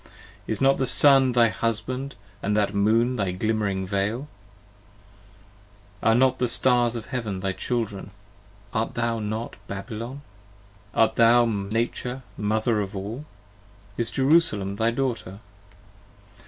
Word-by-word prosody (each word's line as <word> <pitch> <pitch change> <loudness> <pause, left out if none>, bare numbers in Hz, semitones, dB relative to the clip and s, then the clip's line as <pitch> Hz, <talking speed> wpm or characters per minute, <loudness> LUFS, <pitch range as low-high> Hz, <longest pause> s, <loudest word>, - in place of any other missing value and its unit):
Is - - -2
not 135 0 +3
that 130 - +1
Sun 135 -1 +5
thy 120 -1 +5
husband 125 +5 -3
& 100 +1 -28
that 105 0 0
Moon 115 +5 +2
thy 100 -3 0
glimmering 100 0 -1
Veil? 100 +8 -2 1.7
Are 115 - +4
not 130 +1 +3
the 125 - +2
Stars 120 -1 +2
of 115 -2 -5
heaven 110 -8 -4
thy 95 0 -1
Children? 110 -1 -3 0.6
art 110 +1 -2
thou 115 -1 -1
not 110 +2 -4
Babylon? 115 +7 -6 0.7
Art 115 - +3
thou 120 +1 +6
Nature 115 +4 -2
Mother 110 +1 0
of 100 0 -5
all? 110 +9 -5 0.7
is 115 +1 -2
Jerusalem 130 - +2
thy 115 +1 +2
Daughter? 115 -6 -3
115 Hz, 125 wpm, -25 LUFS, 105-125 Hz, 1.7 s, thou